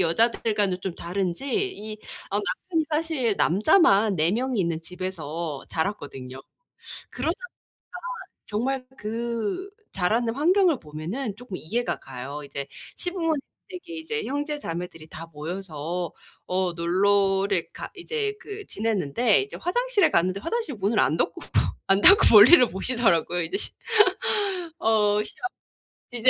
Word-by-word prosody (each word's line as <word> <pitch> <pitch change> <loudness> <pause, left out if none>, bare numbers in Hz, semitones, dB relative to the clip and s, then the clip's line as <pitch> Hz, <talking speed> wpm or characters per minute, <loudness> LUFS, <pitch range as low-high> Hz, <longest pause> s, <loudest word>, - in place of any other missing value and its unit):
여자들과는 205 +1 +1
좀 190 -3 -3
다른지 180 +7 -3 0.3
이 215 0 -7 0.3
어 200 - 0
남편이 320 - -1
사실 300 -8 0
남자만 210 - +4
4 160 +1 +3
명이 250 +2 -1
있는 170 -3 -1
집에서 165 -5 -5
자랐거든요. 140 -8 -4 0.7
그러다 305 +7 -1
보니까 485 0 -11 0.9
정말 255 +5 -2
그 230 - -3 0.2
자라는 225 +5 +1
환경을 345 0 +3
보면은 175 - -5
쪼끔 225 -5 -7
이해가 235 +10 -2
가요. 135 +3 -7
이제 140 0 -5 0.3
시부모님댁에 350 0 -4 0.2
이제 435 +8 -3
형제자매들이 180 - -4
다 160 +1 -9
모여서 165 +1 -4 0.3
어 185 -1 0
놀러를 195 - +2
가 - - -7
이제 420 +2 -2
그 420 -2 -8
지냈는데 215 - +1
이제 405 - -7
화장실에 435 -1 +2
갔는데 185 +3 +1
화장실 390 - -2
문을 205 +2 0
안 - - +2
닫고 - - -1
막 - - +2
안 195 0 +4
닫고 390 - +8
볼일을 240 +5 +9
보시더라고요. 190 -5 +1
이제 165 - -2
시 - - -6 1.1
어 210 -4 +3
시아 210 - -7 0.7
이제 245 +1 +3
210 Hz, 290 characters per minute, -25 LUFS, 175-275 Hz, 1.1 s, 볼일을